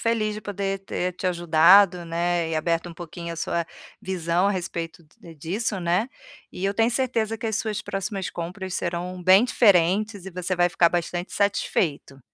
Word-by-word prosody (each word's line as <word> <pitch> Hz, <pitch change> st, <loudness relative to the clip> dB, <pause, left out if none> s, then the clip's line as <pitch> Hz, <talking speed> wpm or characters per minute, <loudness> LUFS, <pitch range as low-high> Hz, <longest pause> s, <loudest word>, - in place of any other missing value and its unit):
feliz 220 Hz, -2 st, 0 dB
de 215 Hz, -, -6 dB
poder 195 Hz, -1 st, -3 dB
ter 180 Hz, -1 st, -3 dB
te 180 Hz, -, -11 dB
ajudado, 175 Hz, +1 st, +5 dB
né, 170 Hz, 0 st, -1 dB
e 160 Hz, -, -1 dB
aberto 165 Hz, +2 st, -1 dB
um 170 Hz, -, -10 dB
pouquinho 170 Hz, 0 st, -7 dB
a -, -, -8 dB
sua 170 Hz, +1 st, -1 dB, 0.4 s
visão 180 Hz, 0 st, 0 dB
a -, -, +2 dB
respeito 170 Hz, -3 st, -5 dB, 0.2 s
d 165 Hz, -5 st, -12 dB
disso, 195 Hz, +7 st, -2 dB
né, 180 Hz, +7 st, 0 dB, 0.4 s
e 185 Hz, -, -5 dB
eu 200 Hz, +1 st, 0 dB
tenho 225 Hz, +2 st, +2 dB
certeza 230 Hz, -3 st, -1 dB
que 230 Hz, -, -4 dB
as 220 Hz, -, -1 dB
suas 215 Hz, 0 st, -2 dB
próximas 195 Hz, -1 st, -4 dB
compras 185 Hz, +2 st, -6 dB
serão 180 Hz, +1 st, -3 dB
bem 190 Hz, +5 st, +6 dB
diferentes 200 Hz, -2 st, +2 dB
e 190 Hz, -, -6 dB
você 180 Hz, 0 st, -2 dB
vai 175 Hz, 0 st, +3 dB
ficar 170 Hz, -1 st, +3 dB
bastante 175 Hz, +1 st, -3 dB
satisfeito. 160 Hz, -8 st, -1 dB
180 Hz, 180 wpm, -24 LUFS, 170-200 Hz, 0.4 s, bem